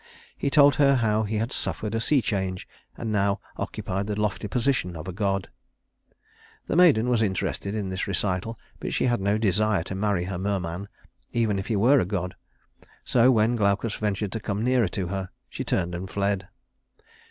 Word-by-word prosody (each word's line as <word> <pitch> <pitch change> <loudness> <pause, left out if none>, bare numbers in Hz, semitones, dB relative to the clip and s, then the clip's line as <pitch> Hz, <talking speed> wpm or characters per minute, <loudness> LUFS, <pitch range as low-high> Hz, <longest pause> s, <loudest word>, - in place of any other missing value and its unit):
He - - -1
told 145 -1 +6
her 140 -1 +5
how 110 -3 +2
he 105 +2 -3
had 115 +4 -1
suffered 110 0 -2
a 115 - 0
sea 135 +1 +2
change, 95 -3 -2 0.3
and 115 -2 -3
now 100 -1 +1 0.2
occupied 100 -2 -3
the 105 0 -2
lofty 105 0 -1
position 115 -4 0
of 80 +2 -7
a 95 - -4
god. 100 -1 -1 1.1
The - - -2
maiden 155 -10 +5
was 120 -2 +2
interested 100 0 -1
in 100 -3 -2
this 95 0 -3
recital, 100 +3 -1 0.2
but - - -3
she - - +1
had 120 -5 +1
no 100 +2 +2
desire 105 -2 +1
to 95 - -6
marry 100 -2 0
a 95 -1 -4
merman, 95 -1 -2 0.5
even 110 -4 +1
if 95 - -5
he 110 - 0
were 125 +8 +5
a - - +1
god; 90 -1 -3 0.7
so 125 0 +4
when 115 -1 +3
Glaucus 105 0 +1
ventured 105 -1 -2
to 115 - -3
come 105 +1 -3
nearer 125 -3 +3
to 90 0 -3
her, 95 -1 -3 0.2
she - - -5
turned 85 0 -1
and 90 +2 -5
fled. 100 -2 -1
105 Hz, 185 wpm, -26 LUFS, 95-115 Hz, 1.1 s, told